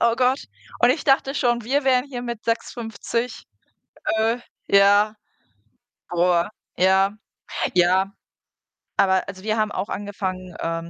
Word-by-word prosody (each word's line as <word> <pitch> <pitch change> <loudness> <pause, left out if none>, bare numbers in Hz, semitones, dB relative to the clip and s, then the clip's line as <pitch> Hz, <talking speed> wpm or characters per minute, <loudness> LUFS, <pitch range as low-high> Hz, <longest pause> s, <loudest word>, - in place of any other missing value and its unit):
Oh 235 0 +3
Gott. 255 +2 +2 0.4
Und - - +6
ich - - -1
dachte 270 -1 +3
schon, 240 -4 +1
wir 275 +4 +1
wären 255 -1 +3
hier 255 -4 -6
mit 235 -2 -5
6,50 230 0 -3 0.7
äh, 225 +2 +2 0.3
ja 205 +2 +5 0.9
boah, 175 0 +2 0.3
ja 190 +2 +4 0.6
ja, 185 +2 +3 0.9
aber 190 -1 +3
also, 190 -1 -8
wir 215 +1 0
haben 215 -1 +1
auch 195 0 -3
angefangen, 185 -3 -5
ähm, 165 0 -3
210 Hz, 125 wpm, -23 LUFS, 190-240 Hz, 0.9 s, Und